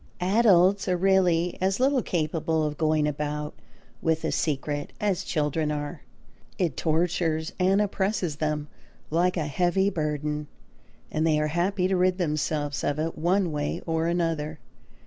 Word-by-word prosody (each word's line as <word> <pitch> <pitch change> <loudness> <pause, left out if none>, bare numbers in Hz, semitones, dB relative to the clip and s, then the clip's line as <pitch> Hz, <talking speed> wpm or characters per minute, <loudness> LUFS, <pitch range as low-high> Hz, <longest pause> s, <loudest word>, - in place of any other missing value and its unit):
Adults 195 0 +4
are 180 -1 +2
really 180 -2 +2
as 190 +3 +1
little 265 0 +3
capable 160 -3 -1
of 150 -1 -2
going 155 -1 +2
about 150 0 -3 0.5
with 160 -1 0
a - - 0
secret 145 -1 -2
as 195 -3 0
children 150 -1 -1
are. 145 +1 -4 0.6
It 170 -7 0
tortures 165 -1 0
and 190 +2 +3
oppresses 195 -5 -1
them 150 -1 -1 0.4
like 180 +3 +2
a 160 - 0
heavy 180 +6 +1
burden; 150 -2 -2 0.6
and 155 +1 +1
they 155 -1 +3
are 150 0 0
happy 180 +2 +1
to 190 - +1
rid 180 0 +2
themselves 150 -3 -1
of 145 - 0
it 160 +2 -2
one 180 +2 +1
way 145 -1 -2
or 165 0 0
another. 165 -3 -1
165 Hz, 145 wpm, -26 LUFS, 150-185 Hz, 0.6 s, Adults